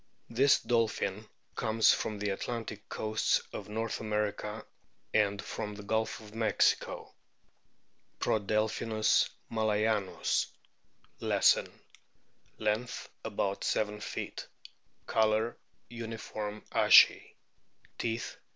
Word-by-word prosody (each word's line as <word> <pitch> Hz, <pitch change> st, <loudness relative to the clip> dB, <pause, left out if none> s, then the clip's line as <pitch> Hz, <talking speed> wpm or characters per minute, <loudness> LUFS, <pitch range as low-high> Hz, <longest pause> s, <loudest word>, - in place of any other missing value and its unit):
This 135 Hz, +4 st, +5 dB
dolphin 110 Hz, -3 st, 0 dB, 0.3 s
comes 110 Hz, -1 st, +4 dB
from 110 Hz, -, -2 dB
the 105 Hz, 0 st, -1 dB
Atlantic 110 Hz, 0 st, -5 dB
coasts 110 Hz, 0 st, +1 dB
of 105 Hz, 0 st, -6 dB
North 110 Hz, +1 st, -2 dB
America 105 Hz, 0 st, -2 dB, 0.5 s
and 100 Hz, -2 st, +2 dB
from 105 Hz, +1 st, -5 dB
the 105 Hz, -, -9 dB
Gulf 110 Hz, +2 st, -1 dB
of 105 Hz, -1 st, -13 dB
Mexico. 110 Hz, -2 st, +1 dB, 1.1 s
Prodelphinus 110 Hz, +1 st, +1 dB, 0.2 s
malayanus, 110 Hz, -2 st, +1 dB, 0.7 s
Lesson, -, -, +3 dB
f -, -, -29 dB
Length 110 Hz, +3 st, -2 dB
about 100 Hz, -2 st, -2 dB
seven 105 Hz, -1 st, 0 dB
feet. -, -, -5 dB, 0.6 s
Colour 110 Hz, +1 st, +2 dB, 0.3 s
uniform 110 Hz, -2 st, -6 dB
ashy. -, -, +6 dB, 0.6 s
Teeth, 115 Hz, 0 st, -2 dB
39. -, -, -31 dB
110 Hz, 95 wpm, -31 LUFS, 105-110 Hz, 1.1 s, ashy